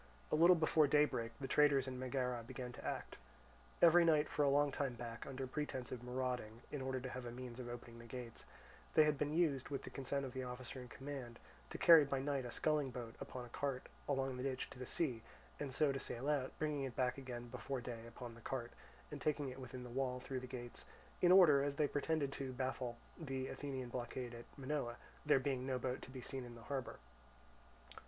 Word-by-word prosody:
A -, -, +4 dB
little 170 Hz, +3 st, +8 dB
before 155 Hz, -2 st, +4 dB
daybreak, 140 Hz, -5 st, +3 dB
the 135 Hz, -, -3 dB
traitors 140 Hz, -1 st, +5 dB
in 130 Hz, -1 st, -4 dB
Megara 125 Hz, -2 st, -1 dB
began 125 Hz, +2 st, -6 dB
to -, -, -10 dB
act. -, -, -4 dB, 0.6 s
Every 170 Hz, +1 st, +9 dB
night 155 Hz, -2 st, +5 dB
for -, -, -1 dB
a 145 Hz, -, +5 dB
long 145 Hz, +1 st, +4 dB
time 135 Hz, -2 st, -1 dB
back, 120 Hz, -1 st, -6 dB
under 135 Hz, -1 st, -3 dB
pretence 130 Hz, -2 st, -3 dB
of 125 Hz, -, -4 dB
marauding, 125 Hz, -2 st, -3 dB
in 145 Hz, -, -3 dB
order 130 Hz, 0 st, -1 dB
to 130 Hz, +1 st, -5 dB
have 125 Hz, 0 st, -5 dB
a 120 Hz, -, -4 dB
means 125 Hz, 0 st, -7 dB
of 120 Hz, -1 st, -5 dB
opening 120 Hz, -1 st, -8 dB
the 115 Hz, -, -10 dB
gates, 120 Hz, -1 st, -7 dB, 0.5 s
they 155 Hz, -, +9 dB
had 150 Hz, -1 st, +3 dB
been 145 Hz, +1 st, -1 dB
used, 150 Hz, -7 st, +2 dB
with 140 Hz, -2 st, -3 dB
the -, -, -7 dB
consent 140 Hz, +1 st, -1 dB
of 130 Hz, -, -6 dB
the 130 Hz, -, -3 dB
officer 125 Hz, +1 st, -6 dB
in 125 Hz, -, -8 dB
command, 130 Hz, -2 st, -6 dB, 0.3 s
to -, -, -5 dB
carry 165 Hz, -3 st, +9 dB
by 135 Hz, -1 st, 0 dB
night 135 Hz, -1 st, -1 dB
a 120 Hz, -, -5 dB
sculling 150 Hz, -1 st, +2 dB
boat 120 Hz, -2 st, -6 dB
upon 125 Hz, -1 st, -6 dB
a -, -, -12 dB
cart 135 Hz, +1 st, -2 dB, 0.2 s
along 135 Hz, -2 st, 0 dB
the -, -, -3 dB
ditch 130 Hz, -1 st, -2 dB
to -, -, -10 dB
the 125 Hz, -, -5 dB
sea, 130 Hz, -9 st, 0 dB, 0.4 s
and 145 Hz, -2 st, -3 dB
so 145 Hz, +2 st, +3 dB
to 135 Hz, -, -2 dB
sail 130 Hz, +1 st, -4 dB
out, 145 Hz, -3 st, 0 dB
bringing 150 Hz, -2 st, 0 dB
it 130 Hz, -3 st, -4 dB
back 125 Hz, +1 st, +1 dB
again 120 Hz, -2 st, -6 dB
before 135 Hz, +2 st, -3 dB
day 120 Hz, -2 st, -6 dB
upon 120 Hz, 0 st, -8 dB
the 120 Hz, -, -13 dB
cart, 120 Hz, 0 st, -3 dB, 0.4 s
and 145 Hz, -2 st, -6 dB
taking 145 Hz, -2 st, +1 dB
it 130 Hz, +1 st, -8 dB
within 130 Hz, -1 st, -7 dB
the 125 Hz, -, -8 dB
wall 125 Hz, 0 st, 0 dB
through 130 Hz, +1 st, -3 dB
the 125 Hz, -, -7 dB
gates, 120 Hz, -2 st, -6 dB, 0.4 s
in 180 Hz, -, +6 dB
order, 170 Hz, -7 st, +8 dB
as 140 Hz, 0 st, 0 dB
they 150 Hz, 0 st, +3 dB
pretended, 145 Hz, 0 st, 0 dB
to 135 Hz, -2 st, -4 dB
baffle 130 Hz, -2 st, -2 dB, 0.2 s
the 135 Hz, -4 st, -3 dB
Athenian 135 Hz, -3 st, -4 dB
blockade 120 Hz, 0 st, -4 dB
at 120 Hz, 0 st, -8 dB
Minoa, 135 Hz, -3 st, -2 dB, 0.3 s
there 150 Hz, -, +6 dB
being 130 Hz, -1 st, -1 dB
no 130 Hz, -1 st, +1 dB
boat 125 Hz, +1 st, -2 dB
to -, -, -9 dB
be 130 Hz, -1 st, -7 dB
seen 130 Hz, +1 st, -3 dB
in 120 Hz, -1 st, -9 dB
the 115 Hz, -, -11 dB
harbour. 135 Hz, 0 st, -3 dB
130 Hz, 225 wpm, -39 LUFS, 125-145 Hz, 0.6 s, Every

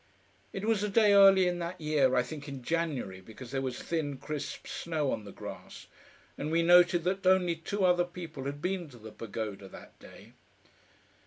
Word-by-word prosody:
It 195 Hz, +1 st, -5 dB
was 220 Hz, -3 st, +1 dB
a 210 Hz, -, -1 dB
day 210 Hz, 0 st, +4 dB
early 195 Hz, -2 st, +7 dB
in 175 Hz, 0 st, -1 dB
that 170 Hz, +1 st, -5 dB
year 150 Hz, -4 st, +2 dB
I 125 Hz, -, +3 dB
think 150 Hz, +1 st, -8 dB
in 135 Hz, -3 st, -7 dB
January, 145 Hz, -, -2 dB
because 115 Hz, +5 st, -11 dB
there 135 Hz, -1 st, -1 dB
was 130 Hz, -2 st, -4 dB
thin, 150 Hz, -5 st, -2 dB
crisp 150 Hz, +1 st, -6 dB
snow 155 Hz, -5 st, -2 dB
on 105 Hz, -, -4 dB
the 100 Hz, -, -9 dB
grass, -, -, -10 dB, 0.5 s
and 150 Hz, -, -3 dB
we 165 Hz, +1 st, +2 dB
noted 175 Hz, 0 st, +5 dB
that 190 Hz, +1 st, -1 dB
only 185 Hz, -2 st, +4 dB
two 190 Hz, +4 st, -2 dB
other 175 Hz, -1 st, +3 dB
people 165 Hz, -6 st, -8 dB
had 145 Hz, +1 st, -5 dB
been 180 Hz, -3 st, -2 dB
to 125 Hz, -, -14 dB
the 110 Hz, -1 st, -11 dB
Pagoda 105 Hz, -2 st, -6 dB
that -, -, -14 dB
day. -, -, -15 dB
165 Hz, 190 wpm, -30 LUFS, 135-180 Hz, 0.5 s, early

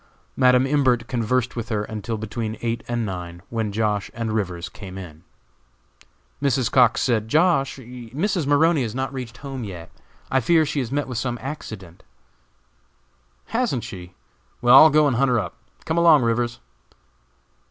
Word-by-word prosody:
Madam 125 Hz, 0 st, +4 dB
Imbert 130 Hz, -4 st, +2 dB
conversed 125 Hz, +1 st, -1 dB
with 115 Hz, -1 st, -5 dB
her 105 Hz, -2 st, -1 dB
until 110 Hz, +1 st, -5 dB
between 110 Hz, +1 st, -4 dB
eight 115 Hz, 0 st, -1 dB
and 120 Hz, -1 st, -1 dB
nine, 90 Hz, -3 st, -6 dB
when 110 Hz, -3 st, -2 dB
Josh. 105 Hz, -1 st, -1 dB
and 115 Hz, -1 st, -3 dB
Rivers 90 Hz, -5 st, -2 dB
came 95 Hz, -2 st, -10 dB
in. 85 Hz, -4 st, -10 dB, 1.2 s
Mrs. 135 Hz, -3 st, +1 dB
Cox 125 Hz, -4 st, +4 dB
said, 110 Hz, -4 st, +1 dB
"Josh., 150 Hz, -1 st, +2 dB
Mrs. 130 Hz, -, -3 dB
Maroney 150 Hz, +2 st, +3 dB
has 115 Hz, -3 st, -3 dB
not 130 Hz, +1 st, -3 dB
reached 125 Hz, -3 st, -7 dB
home 135 Hz, -3 st, -6 dB
yet. 90 Hz, -5 st, -8 dB, 0.4 s
I 130 Hz, -, +3 dB
fear 160 Hz, +6 st, +3 dB
she 150 Hz, 0 st, -2 dB
has 125 Hz, -3 st, -3 dB
met 145 Hz, +1 st, -1 dB
with 125 Hz, -3 st, -3 dB
some 120 Hz, 0 st, -2 dB
accident." 110 Hz, -, -8 dB, 1.5 s
"Hasn't 225 Hz, -, -1 dB
she? 90 Hz, -1 st, -9 dB, 0.4 s
Well, 120 Hz, 0 st, +4 dB
I'll 155 Hz, +4 st, +10 dB
go 150 Hz, 0 st, +4 dB
and 135 Hz, -5 st, +1 dB
hunt 135 Hz, +1 st, +3 dB
her 125 Hz, -, +2 dB
up. 90 Hz, -5 st, -5 dB, 0.3 s
Come 160 Hz, +1 st, 0 dB
along, 165 Hz, -5 st, +6 dB
Rivers." 120 Hz, +1 st, 0 dB
120 Hz, 160 wpm, -23 LUFS, 110-135 Hz, 1.5 s, I'll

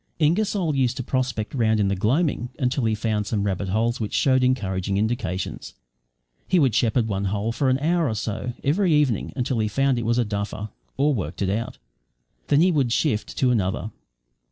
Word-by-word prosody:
Ingersoll 175 Hz, +1 st, +1 dB
used 130 Hz, -2 st, +1 dB
to 130 Hz, -, -3 dB
prospect 125 Hz, -4 st, -2 dB
round 110 Hz, -4 st, +2 dB
in 100 Hz, -, +2 dB
the 100 Hz, -, 0 dB
gloaming 125 Hz, -, 0 dB
until 125 Hz, 0 st, 0 dB
he 110 Hz, -1 st, +1 dB
found 105 Hz, -1 st, -1 dB
some 105 Hz, -3 st, -1 dB
rabbit 100 Hz, -1 st, -2 dB
holes 115 Hz, +5 st, 0 dB
which 105 Hz, -2 st, -3 dB
showed 130 Hz, -1 st, +3 dB
encouraging 100 Hz, -6 st, 0 dB
indications. 100 Hz, -4 st, -3 dB, 0.7 s
He 185 Hz, -, +2 dB
would 135 Hz, -8 st, +3 dB
shepherd 115 Hz, 0 st, +2 dB
one 100 Hz, -2 st, -2 dB
hole 105 Hz, +3 st, -1 dB
for 130 Hz, +3 st, 0 dB
an 130 Hz, -, +3 dB
hour 165 Hz, +3 st, +1 dB
or 110 Hz, -, -2 dB
so 110 Hz, +3 st, -3 dB
every 175 Hz, +6 st, +2 dB
evening 145 Hz, -8 st, +2 dB
until 125 Hz, -2 st, -1 dB
he 110 Hz, -, +1 dB
found 135 Hz, +3 st, +1 dB
it 115 Hz, -, -4 dB
was 115 Hz, +1 st, +2 dB
a 120 Hz, -, +2 dB
duffer, 105 Hz, 0 st, -4 dB, 0.3 s
or 145 Hz, +2 st, +3 dB
worked 90 Hz, -, -3 dB
it 95 Hz, -, 0 dB
out; 115 Hz, +3 st, -3 dB, 0.7 s
then 145 Hz, -, +4 dB
he 180 Hz, +2 st, +4 dB
would 140 Hz, -7 st, +1 dB
shift 115 Hz, -4 st, 0 dB
to 130 Hz, -2 st, +3 dB
another. 105 Hz, -1 st, -1 dB
120 Hz, 195 wpm, -24 LUFS, 105-135 Hz, 0.7 s, then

